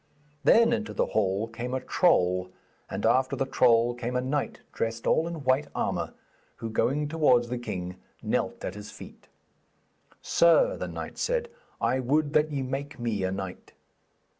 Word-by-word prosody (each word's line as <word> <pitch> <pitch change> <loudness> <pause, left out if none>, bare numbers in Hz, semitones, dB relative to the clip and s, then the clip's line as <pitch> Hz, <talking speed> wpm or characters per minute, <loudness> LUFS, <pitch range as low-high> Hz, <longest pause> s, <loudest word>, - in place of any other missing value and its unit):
Then 230 +1 +5
into 225 -1 -3
the - - +2
hall 100 +1 0
came 120 +3 -4
a - - 0
troll, 90 - +2 0.4
and - - -3
after 130 0 +3
the 135 - 0
troll 120 -2 +3
came 120 +1 -4
a - - +2
knight 135 +3 -2
dressed 115 0 -3
all 160 - +2
in 165 -4 -6
white 130 +3 +2
armour, - - -2 0.4
who, 115 -1 -6
going 145 +6 +1
towards 135 -7 +3
the 125 0 -3
king, 90 -6 -5 0.3
knelt - - -1
at 90 - -3
his 105 0 -9
feet. - - -13 0.9
'Sir,' 335 - +4
the - - -4
knight - - -7
said, 485 -1 0 0.3
'I 130 - +1
would 145 +4 +1
that 150 +1 +3
ye 140 -2 -2
make 140 +3 -4
me 115 -5 -2
a 95 - 0
knight.' 95 -1 -6
125 Hz, 165 wpm, -27 LUFS, 115-150 Hz, 0.9 s, Then